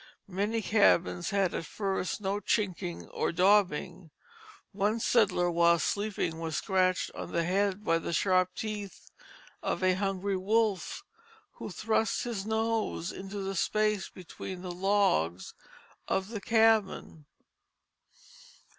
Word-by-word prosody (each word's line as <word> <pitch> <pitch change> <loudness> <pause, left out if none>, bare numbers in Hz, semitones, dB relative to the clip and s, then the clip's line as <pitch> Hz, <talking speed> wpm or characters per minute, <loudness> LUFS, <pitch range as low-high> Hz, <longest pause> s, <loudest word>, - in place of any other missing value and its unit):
Many 210 +4 -1
cabins 180 -4 +3
had 195 -3 +1
at 165 - -4
first 195 -1 -2
no 200 +1 -1
chinking 190 -5 -2
or - - -1
daubing; 180 -2 +2 0.6
one 210 +3 0
settler 195 -7 +2
while 170 0 +4
sleeping 195 -3 -2
was 165 -2 -3
scratched 185 -1 +1
on - - -7
the 170 - +1
head 195 +3 0
by 165 -3 +2
the 165 - -4
sharp 185 +1 +2
teeth 210 -3 -6 0.5
of - - -2
a 185 0 +4
hungry 195 0 -1
wolf, 210 - 0 0.5
who - - -8
thrust 220 0 0
his 215 -4 -4
nose 220 -5 -1
into 195 +1 -6
the 195 0 -3
space 210 +2 0
between 185 0 -8
the 180 - -4
logs 175 - +1 0.5
of 190 +1 -1
the 220 -3 -5
cabin. 220 -8 +2
195 Hz, 125 wpm, -30 LUFS, 180-210 Hz, 0.6 s, while